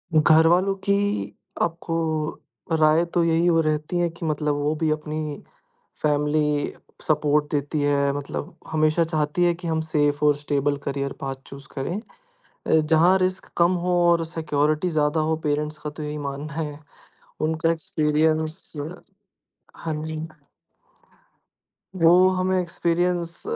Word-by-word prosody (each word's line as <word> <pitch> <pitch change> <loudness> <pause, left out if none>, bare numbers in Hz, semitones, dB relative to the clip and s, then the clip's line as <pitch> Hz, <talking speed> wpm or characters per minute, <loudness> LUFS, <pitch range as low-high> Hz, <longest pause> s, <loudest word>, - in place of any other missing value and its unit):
घर 155 +1 +6
वालों 185 +3 +3
की 200 0 +3 0.7
आपको 165 0 -1 0.8
राय 155 +1 +4
तो 175 - +3
यही 165 +1 +2
हो 165 -2 +4
रहती 155 +2 -1
है 175 -1 +2
कि 165 0 -8
मतलब 150 -1 0
वो 145 +1 0
भी 155 0 0
अपनी 155 -1 -3 0.6
फैमिली 150 0 +1 0.3
सपोर्ट 150 -1 +2
देती 145 +1 -1
है। 140 -1 +2
मतलब 145 +4 -5 0.2
हमेशा 155 +1 +3
चाहती 155 +1 0
है 175 - +3
कि 175 0 -7
हम 160 -1 0
सेफ 145 -1 +1
और 150 -1 +5
स्टेबल 145 -1 -1
करियर 140 0 -2
पाथ 135 -1 -3
चूज़ 140 0 -11
करें। 170 +9 -2 0.7
अ, - - 0
जहाँ 160 +4 +4
रिस्क 185 0 -2
कम 170 +1 +4
हो 180 -1 +2
और 170 -1 +3
सिक्योरिटी 155 +1 0
ज़्यादा 155 0 +1
हो, 160 +1 +1
पेरेंट्स 150 0 -2
का 150 0 -5
तो 155 +1 -8
यही 150 0 -4
मानना 140 +2 -6
है। 150 -2 -4 0.6
उनका 160 +1 +1
एक्सपीरियंस 155 +1 0 1.0
हाँ 160 -2 -4
जी। 160 0 -4 1.7
वो 165 -1 +6 0.2
हमें 185 0 +1
एक्सपीरियंस 175 0 -1
155 Hz, 140 wpm, -24 LUFS, 150-165 Hz, 1.7 s, घर